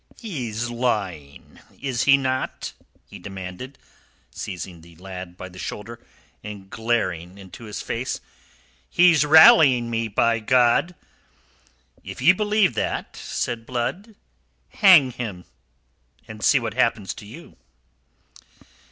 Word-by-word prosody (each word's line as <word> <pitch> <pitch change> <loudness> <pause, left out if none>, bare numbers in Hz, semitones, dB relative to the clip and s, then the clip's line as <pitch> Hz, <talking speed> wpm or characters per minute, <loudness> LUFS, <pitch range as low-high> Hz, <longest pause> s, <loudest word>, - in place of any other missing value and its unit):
"He's 120 - -4
lying, 100 - -4 0.2
is 130 -4 -2
he 140 -1 +6
not?" 130 -1 -3 0.3
he - - -12
demanded, 95 +8 -8 0.5
seizing 90 -2 -7
the 85 0 -17
lad 90 0 -9
by 95 - -8
the 90 0 -13
shoulder, 115 +5 -7 0.4
and 100 -2 -9
glaring 105 -6 -2
into 100 +4 -12
his 105 -1 -6
face. 125 +3 -3 0.7
"He's 170 -4 +5
rallying 140 -6 +7
rue, 115 -1 -2
by 115 +2 +1
God!" 125 +9 +2 1.1
"If - - -9
ye 140 +8 +6
believe 210 - +1
that," 110 - -3
said 115 -1 -4
Blood, 180 - -4 0.5
"hang 180 - +6
him, 110 -8 -7 0.8
and 110 -1 -10
see 145 - +5
what 115 -4 -4
happens 115 -5 0
to 105 - -12
you." 160 +11 -13
115 Hz, 115 wpm, -23 LUFS, 100-130 Hz, 1.1 s, rallying